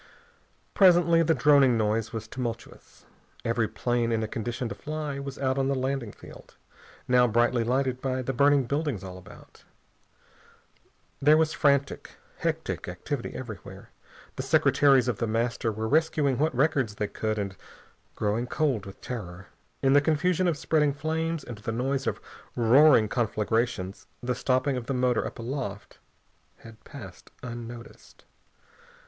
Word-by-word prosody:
Presently 175 -3 +5
the 165 0 +2
droning 135 -2 +5
noise 110 0 0
was 115 -1 -6
tumultuous. 115 -1 -7 0.4
Every - - +1
plane 120 -1 -1
in 115 -1 0
a - - -2
condition 120 +3 -4
to - - -4
fly 150 +3 -5
was 140 0 -6
out 130 0 0
on 135 - +1
the 140 - +1
landing 130 -3 -2
field, - - -14 0.5
now 125 -1 +5
brightly 120 +1 +2
lighted 130 +1 0
by 130 -1 -2
the 135 - -2
burning 140 +2 +4
buildings 140 - -2
all 95 -1 -8
about. 90 - -16 1.6
There 150 +2 +6
was 160 0 +2
frantic, 140 -1 0 0.2
hectic - - -2
activity 120 - -5
everywhere. 110 -7 -9 0.5
The - - -1
secretaries 135 -3 +4
of 120 -5 -1
The 115 - 0
Master 115 +1 -1
were 110 +1 -3
rescuing 145 -2 +1
what 155 -1 +1
records 135 -5 +1
they 105 - -2
could, 110 +1 -3
and 100 -2 -3 0.6
growing 110 +4 -1
cold 125 -8 -1
with 95 - -12
terror. 95 -7 -7 0.3
In 135 0 +4
the 145 - +6
confusion 165 +4 +1
of 165 -4 0
spreading 150 -1 +1
flames 160 +2 -2
and 115 -3 -8
the 105 - -4
noise 135 +4 -1
of - - -1 0.4
roaring 120 0 +6
conflagrations 110 -3 -1 0.2
the 125 +1 0
stopping 130 +2 0
of 120 - -6
the 135 - -1
motor 125 -1 +1
up - - -9
aloft 115 -4 -6 0.6
had 115 -1 -15
passed - - -11
unnoticed. 120 -1 -10
125 Hz, 150 wpm, -27 LUFS, 115-140 Hz, 1.6 s, There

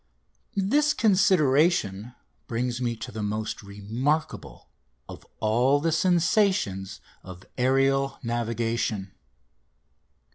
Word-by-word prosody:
This 290 +10 +2
consideration 150 - +2 0.3
brings 120 +1 -2
me 120 -1 -1
to - - -8
the 110 - -6
most 105 +1 -3
remarkable 110 +10 -3 0.4
of - - -11
all 125 +6 +2
the 165 +3 0
sensations 170 - +1 0.2
of 90 0 -11
aerial 135 +1 +1
navigation. 115 -4 -2
125 Hz, 85 wpm, -26 LUFS, 110-160 Hz, 0.4 s, This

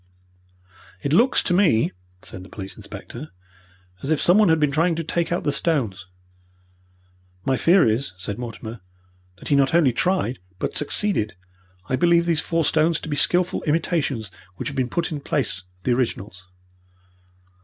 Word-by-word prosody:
"It 140 - 0
looks 240 +9 +4
to 180 - 0
me," 155 - +3 0.3
said 95 - -7
the 95 - -13
police 95 -1 -8
inspector, 140 +6 -9 0.7
"as 140 - -5
if 155 -2 +2
someone 200 +2 +5
had 160 0 +4
been 150 -2 +2
trying 165 +4 +2
to 165 - -3
take 170 +1 -1
out 175 - 0
the 145 - +1
stones." 120 - -1 1.4
"My 135 - +2
fear 170 +3 +4
is," 110 0 0
said 100 +3 -6
Mortimer, 115 -2 -7 0.6
"that - - -9
he 145 - +4
not 140 +3 +3
only 150 -8 +4
tried, 175 -3 0 0.2
but - - -3
succeeded. 150 - 0 0.5
I 130 - -1
believe 170 +1 +4
these 165 -2 +2
four 165 -1 0
stones 160 +2 +2
to - - -7
be 145 - -1
skilful 180 +4 +2
imitations 150 - 0 0.2
which - - -4
have 145 - -8
been 130 -2 0
put 170 +5 -1
in 150 - -3
the - - -19
place 135 -10 -1
of 90 - -19 0.2
the 125 - +2
originals." 100 -7 -3
145 Hz, 170 wpm, -23 LUFS, 120-170 Hz, 1.4 s, someone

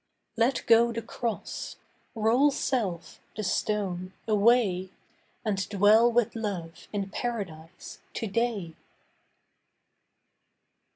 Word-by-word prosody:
Let 240 +3 +1
go 235 +1 +5
the 230 0 -4
cross; 235 -3 -4 0.4
roll 230 +6 +4
self—the 215 - -3
stone—away 200 +1 +1 0.6
And 195 -3 -1
dwell 215 +4 +5
with 235 -2 +2
Love 190 -7 -5
in 200 -2 -3
Paradise 180 -8 -5 0.2
to - - -2
day. 210 -5 -1
215 Hz, 80 wpm, -28 LUFS, 190-235 Hz, 0.6 s, go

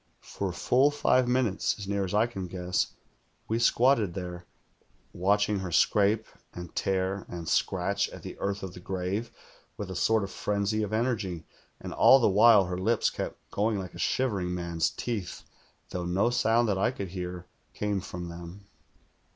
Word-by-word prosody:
For 100 -2 -4
full 125 +10 +3
five 130 -3 +2
minutes, 125 -6 +1
as 100 -2 -7
near 100 0 0
as 95 +1 -3
I 110 +2 +4
can 95 -6 -5
guess, 90 0 -1 0.6
we 115 +1 0
squatted 115 -6 +3
there 90 -2 -6 0.7
watching 105 +3 +2
her 95 -2 -5
scrape 105 +5 +3 0.3
and 90 -1 -8
tear 95 0 -1
and 85 -2 -6
scratch 100 +4 +1
at - - -11
the - - -7
earth 100 0 -2
of 95 -2 -6
the - - -10
grave, 95 +5 -3 0.5
with 100 -2 -5
a - - -5
sort 110 +3 +2
of 100 - -5
frenzy 105 +1 -1
of 105 -1 -2
energy; 110 -7 -1 0.3
and - - -7
all 135 - +7
the 120 - +3
while 105 0 +6
her 90 0 -4
lips 110 +4 +2
kept - - -6
going 105 +1 0
like 95 -2 -6
a - - -10
shivering 100 -9 0
man's 85 -2 0
teeth, 105 -8 -5 0.5
though 90 -1 -3
no 95 +7 +1
sound 120 0 +2
that 100 -3 0
I - - +3
could 100 -7 -5
hear 90 -1 -6 0.3
came 105 -2 -1
from 90 0 -6
them. 85 +4 -9
100 Hz, 175 wpm, -28 LUFS, 90-110 Hz, 0.7 s, all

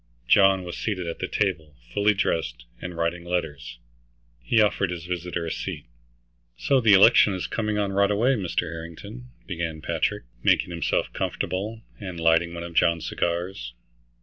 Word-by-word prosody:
John 95 +1 +5
was 90 -1 -6
seated 95 -5 -2
at 85 - -5
the - - -2
table, 80 -7 -2 0.2
fully 105 0 +3
dressed, - - -1 0.2
and 90 -1 -6
writing 85 +1 -1
letters. 85 -8 -4 0.6
He 85 - +2
offered 105 -3 +2
his 85 -1 -5
visitor 90 -1 -3
a 80 - -3
seat. - - -5 0.7
"So 135 -2 +2
the 110 -3 +5
election 100 0 +6
is 90 - -3
coming 105 -2 -2
on 100 -1 0
right 100 +1 +3
away, 110 +6 +2
Mr. 95 -9 -1
Harrington," 85 +9 -8 0.2
began 85 -4 -4
Patrick, 75 - -1 0.2
making 90 - +2
himself 85 -1 -1
comfortable, 110 +5 -3 0.2
and 95 -4 -6
lighting 80 +1 +3
one 85 - -5
of 85 0 -8
John's 85 0 +2
cigars. 85 -8 -3
90 Hz, 160 wpm, -25 LUFS, 85-100 Hz, 0.7 s, election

